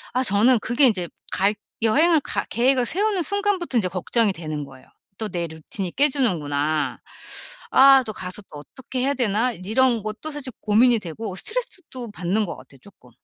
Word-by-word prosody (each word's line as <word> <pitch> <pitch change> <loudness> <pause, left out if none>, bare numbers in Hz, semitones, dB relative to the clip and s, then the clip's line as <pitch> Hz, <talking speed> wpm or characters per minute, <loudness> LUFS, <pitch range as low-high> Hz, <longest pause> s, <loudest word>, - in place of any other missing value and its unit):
아 255 +1 +1
저는 225 +4 +4
그게 245 +6 +4
인제 185 -8 +1 0.2
갈 200 +2 +1 0.3
여행을 310 +9 +4
갈 - - -4
계획을 250 +1 +2
세우는 395 - +1
순간부터 400 -5 -1
인제 190 -5 0
걱정이 200 +4 +1
되는 155 -4 -5
거예요. 135 -2 -15 0.3
'또 220 - -3
내 175 -4 -2
루틴이 165 +3 -6
깨지는구나. 155 - 0 0.7
아 270 0 +7
또 215 - -4
가서 185 +3 -6
또 145 - -9
어떻게 260 - -7
해야 275 +3 +1
되나?' 240 0 +1
이런 225 +4 +1
것도 215 +9 -5
사실 285 -3 -7
고민이 230 +3 +4
되고 190 +3 -6
스트레스도 370 - -4
받는 195 +4 -1
것 170 - -6
같아요 135 - -16
쪼끔. 160 -11 -18
225 Hz, 355 characters per minute, -23 LUFS, 180-265 Hz, 0.7 s, 아